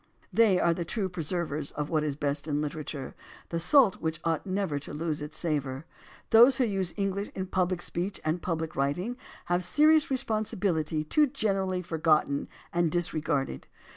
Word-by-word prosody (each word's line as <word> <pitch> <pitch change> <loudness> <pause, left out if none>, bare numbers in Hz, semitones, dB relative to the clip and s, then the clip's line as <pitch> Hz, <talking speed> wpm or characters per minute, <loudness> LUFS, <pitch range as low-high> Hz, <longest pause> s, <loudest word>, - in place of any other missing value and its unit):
They 205 -3 +5
are 170 - +3
the 170 - -3
true 190 +3 -2
preservers 160 -4 -2
of 150 0 -4
what 155 -2 +2
is 150 -2 -1
best 145 0 -1
in 145 -1 0
literature, 150 -2 -5 0.4
the 170 - -2
salt 235 - +5
which 160 0 -2
ought 165 +3 -1
never 185 -6 -1
to 145 - -9
lose 155 -1 -2
its 150 +1 -5
savor. 145 -3 -2 0.5
Those 235 +3 +8
who 260 - +3
use 195 -6 0
English 200 0 -1
in 190 - -3
pubHc 185 -1 0
speech 185 +4 -3
and 160 +2 0
public 160 -2 -3
writing 150 - -1 0.3
have 175 0 +1
a - - -5
serious 305 - +4
re 265 - +1
sponsibility 200 - -1
too 300 - +3
generally 195 -8 -1
forgotten 155 -4 +1 0.2
and 170 -1 +2
disregarded. 155 -5 -1
170 Hz, 170 wpm, -28 LUFS, 155-195 Hz, 0.5 s, Those